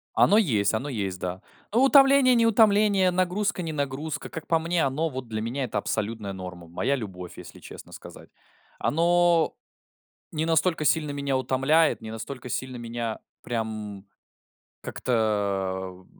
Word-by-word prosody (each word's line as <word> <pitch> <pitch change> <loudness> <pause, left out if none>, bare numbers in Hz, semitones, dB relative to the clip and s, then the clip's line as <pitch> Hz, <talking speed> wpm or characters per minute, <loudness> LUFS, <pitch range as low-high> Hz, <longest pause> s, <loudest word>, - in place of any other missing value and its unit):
Оно 205 - +5
есть, 110 - +2
оно 130 +7 -2
есть, 100 -7 -3
да. 90 +1 -4 0.3
Ну, 235 +4 +3
утомление-не 270 -3 +6
утомление, 210 -3 +4
нагрузка-не 185 -1 -1
нагрузка. 145 0 -4
Как 160 - -7
по 165 - +3
мне, 165 -1 0
оно, 150 +5 -1
вот 130 -3 -6
для 110 -1 -4
меня, 120 +5 -3
это 110 -4 -2
абсолютная 105 -1 -3
норма. 90 -2 -8
Моя 110 +11 -1
любовь, 95 -8 -7
если - - -11
честно - - -12
сказать. - - -12 0.5
Оно 170 +1 +2 0.8
не 160 0 -1
настолько 165 0 +1
сильно 150 0 +2
меня 140 -1 -1
утомляет, 135 +5 +2
не 110 0 -8
настолько 120 +3 -7
сильно 130 +1 -4
меня 115 -1 -4 0.2
прям 110 -4 -5 0.8
как-то, 95 -5 -2
130 Hz, 135 wpm, -26 LUFS, 110-165 Hz, 0.8 s, утомление-не